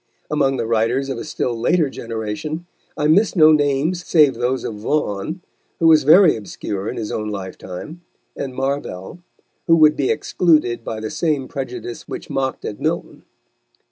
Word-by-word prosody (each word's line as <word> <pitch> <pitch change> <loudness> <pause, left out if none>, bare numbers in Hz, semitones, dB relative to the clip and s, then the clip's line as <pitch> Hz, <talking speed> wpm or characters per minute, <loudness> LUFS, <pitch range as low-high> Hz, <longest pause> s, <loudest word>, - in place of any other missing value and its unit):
Among 135 -3 +1
the 115 - -2
writers 115 +4 0
of 130 -3 -3
a - - -5
still 125 -5 -2
later 155 +8 +2
generation, 115 +7 -5 0.3
I 150 - 0
miss 195 +9 +3
no 155 -3 +7
names 150 +4 +1
save 150 -6 +4
those 125 +2 -1
of - - -4
Vaughan, 115 - -2 0.4
who 165 - 0
was 160 -3 +6
very 170 +3 +7
obscure 100 -1 -5
in - - -5
his 110 -2 -4
own 105 -1 -3
lifetime, 95 - -7 0.3
and 130 -2 -5
Marvell, 135 - -3 0.5
who 165 - +6
would 155 -2 +5
be 135 - 0
excluded 150 -5 +1
by 110 -1 -5
the 110 - -4
same 150 -6 -1
prejudice 125 -3 -6
which - - -7
mocked 130 -1 -2
at 105 - -5
Milton. - - -3
135 Hz, 165 wpm, -20 LUFS, 115-155 Hz, 0.5 s, no